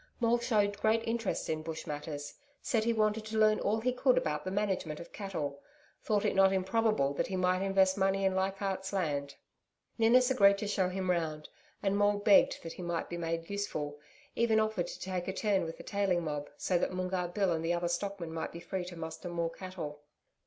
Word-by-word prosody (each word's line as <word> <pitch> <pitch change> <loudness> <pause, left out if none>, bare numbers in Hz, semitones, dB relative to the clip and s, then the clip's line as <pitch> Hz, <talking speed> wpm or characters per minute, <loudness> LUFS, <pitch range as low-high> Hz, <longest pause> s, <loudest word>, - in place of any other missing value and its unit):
Maule 240 0 +3
showed 205 -4 +1
great 225 +1 +2
interest 230 -2 -1
in 155 -1 -1
Bush 160 0 -6
matters 145 -1 -5 0.3
said 225 -5 0
he 235 - +3
wanted 215 -1 +1
to 220 0 -4
learn 215 0 +4
all 215 +2 +1
he 250 +2 +1
could 255 0 +3
about 150 -1 0
the - - -3
management 190 -6 -1
of 170 - -11
cattle 150 -9 -4 0.4
thought 210 -2 +1
it - - +2
not 195 0 +5
improbable 190 -5 +1
that - - -1
he 190 - -3
might 185 0 +2
invest 195 0 +3
money 195 0 +2
in 190 - +3
Leichardt's 190 0 -1
Land. 145 -7 -1 0.6
Ninnis 250 +3 +5
agreed 200 -6 +6
to 210 - -3
show 190 -3 +1
him 185 0 -1
round, 155 -3 -2 0.3
and 195 0 +2
Maule 205 0 +3
begged 205 -2 +4
that 165 - -6
he - - -9
might 170 -1 -2
be 175 - -4
made 165 0 -3
useful 155 -8 -3 0.4
even 225 -2 +3
offered 215 -5 0
to - - -8
take 185 -1 -3
a 190 - -1
turn 195 -3 +1
with 165 - -6
the - - -10
tailing 195 -4 0
mob, 150 -2 -3
so 180 -2 +1
that - - 0
Moongarr 185 -1 -1
Bill 190 +1 0
and 165 -1 -1
the 165 +1 +1
other 175 0 0
stockmen 175 -1 -3
might 165 - -3
be 170 - -8
free 180 +1 -4
to 180 0 -8
muster 160 +2 -6
more 170 -1 -1
cattle. 165 -5 -7
190 Hz, 210 wpm, -32 LUFS, 170-205 Hz, 0.6 s, agreed